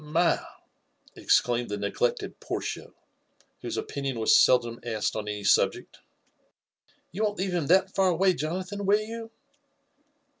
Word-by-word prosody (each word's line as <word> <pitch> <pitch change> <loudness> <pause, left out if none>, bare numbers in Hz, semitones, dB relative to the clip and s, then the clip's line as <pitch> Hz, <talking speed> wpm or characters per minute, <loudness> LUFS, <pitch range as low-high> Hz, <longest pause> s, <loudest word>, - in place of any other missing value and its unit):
*' - - -15
"My 165 +3 +2
1" - - -1 0.8
exclaimed 120 -1 +1
the 105 - -3
neglected 100 +4 -2
Portia, - - -5 0.7
whose - - -4
opinioa 140 -2 -3
wa* 110 -1 -3
feldom 120 -1 +4
asked 110 -3 -2
on 105 -1 -4
any 105 -1 -4
subject, - - +1 0.6
" - - -40
you 200 +6 -3
won't 205 -1 -1
leaye 190 0 -2
bim 170 -5 -1
that 190 +2 +3
f^ 190 -1 +3
away, 185 +2 +3
Jo 160 +1 -3
nathan, 200 +2 -5
will 205 +1 +5
yoi> 225 +1 -7
165 Hz, 155 wpm, -27 LUFS, 120-190 Hz, 0.8 s, will